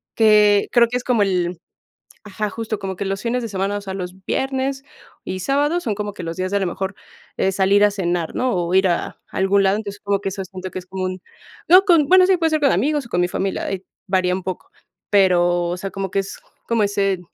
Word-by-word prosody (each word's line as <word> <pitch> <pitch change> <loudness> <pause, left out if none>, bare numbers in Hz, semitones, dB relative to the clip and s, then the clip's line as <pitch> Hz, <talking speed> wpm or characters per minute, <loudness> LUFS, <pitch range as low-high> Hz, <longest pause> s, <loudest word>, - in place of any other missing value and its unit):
que 210 -2 +5
creo 235 -1 +5
que 245 - -1
es 250 - -6
como 245 -4 +1
el 180 -3 -1 0.7
ajá, 210 0 -3
justo 220 -1 -4
como 190 -1 -4
que 200 - -3
los 195 +1 -3
fines 245 +1 -1
de 230 - -4
semana, 195 0 -2
o - - -7
sea, 195 -1 -6
los 180 -1 -5
viernes 265 0 -1 0.4
y 185 - -4
sábados 290 - 0
son 220 -5 -1
como 210 0 -4
que 185 - -8
los 165 0 -5
días 185 0 -2
de 200 - +1
a - - -5
lo 190 - 0
mejor, 190 +2 -4 0.4
eh, 190 - +1
salir 195 +2 +3
a 205 - +5
cenar, 175 -4 -2
¿no? 255 -3 0
O 175 0 -1
ir 190 0 +4
a, 175 - -2
algún 195 +1 +2
lado, 195 +1 +3
entonces, 205 -2 -7
como 200 -1 0
que 195 - -3
eso 195 0 -5
siento 185 0 -8
que - - -5
es - - -16
como 185 0 -4
un 185 0 -4 0.5
no 370 +3 +8
con 335 -7 +4
bueno, 370 +1 +7
sí, 380 0 +4
puede 325 -2 +1
ser 310 -1 +1
con 280 -2 +4
amigos 280 - 0
o - - -13
con 175 - 0
mi 175 - +1
familia, 190 +1 -2
ahí 190 -1 -4 0.2
varía 185 -2 +1
un 185 - -4
poco. 185 -1 -6 0.4
Pero, 175 -3 +3
o 175 - -2
sea, 195 +1 -5
como 195 -1 -4
que 200 - -1
es 195 - -7 0.3
como 230 -2 +2
ese 195 -2 0
195 Hz, 250 wpm, -20 LUFS, 185-230 Hz, 0.7 s, no